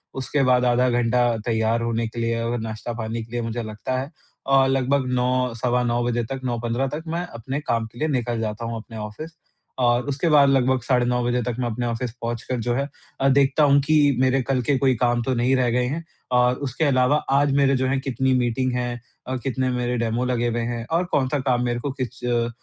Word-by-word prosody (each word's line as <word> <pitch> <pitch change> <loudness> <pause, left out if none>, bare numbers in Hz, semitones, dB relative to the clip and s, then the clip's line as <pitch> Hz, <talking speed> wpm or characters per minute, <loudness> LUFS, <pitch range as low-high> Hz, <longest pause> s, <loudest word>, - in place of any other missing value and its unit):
उसके 135 +1 0
बाद 125 -1 +3
आधा 125 +1 +3
घंटा 120 0 +2 0.2
तैयार 115 0 +1
होने 115 0 -1
के 115 +1 -7
लिए 115 0 0
और 120 +1 -1
नाश्ता-पानी 110 +1 -4
के 115 - -16
लिए 120 0 -2
मुझे 115 +1 -3
लगता 110 +4 -3
है। 140 +5 -5 0.3
और 135 -1 +4
लगभग 135 0 +1
9, 125 -1 +1
सवा 125 +1 0
9 120 0 0
बजे 120 -1 0
तक, 135 +3 -5
9:15 120 +2 -1
तक 150 +4 -5
मैं 170 +2 -2
अपने 135 -1 -5
काम 115 -5 -1
के 120 - -14
लिए 155 - +1
निकल 120 -5 -1
जाता 110 +1 -3
हूँ 115 0 -3
अपने 110 0 -9
ऑफिस। 105 +10 -7 0.5
और 120 -1 +3
उसके 145 +4 0
बाद 145 -2 +6
लगभग 130 -1 +2
साढ़े 125 -1 +2
9 125 0 0
बजे 120 0 +1
तक 120 -1 -2
मैं 120 - 0
अपने 120 +2 -3
ऑफिस 120 0 -2
पहुँचकर 120 +2 -3
जो 120 +1 -1
है 140 +3 -1 0.3
अ, 135 - +4
देखता 140 +2 +3
हूँ 140 -1 +5
कि 145 -1 +3
मेरे 130 +1 +3
कल 130 0 0
के 135 +3 +1
कोई 130 -1 +2
काम 120 0 +1
तो 130 - 0
नहीं 125 +3 +2
रह 125 -2 +2
गए 125 +1 +1
हैं। 160 +6 -3 0.3
और 125 0 +4
उसके 130 +6 -2
अलावा 130 0 +3 0.2
आज 140 +1 +3
मेरे 140 -1 +4
जो 130 0 0
हैं 135 0 +1
कितनी 130 0 0
मीटिंग 125 +1 +1
हैं 120 -1 -2 0.3
और 130 0 -2
कितने 130 0 -1
मेरे 125 0 -1
डेमो 115 +1 -1
लगे 120 -1 0
हुए 120 0 -1
हैं 120 -1 -4
और 170 +2 +2
कौन-सा 140 +1 +1
काम 125 -2 +1
मेरे 120 0 -1
को 140 +2 -3
किस 125 0 -5
अ, 120 -1 +1
125 Hz, 230 wpm, -23 LUFS, 120-135 Hz, 0.5 s, बाद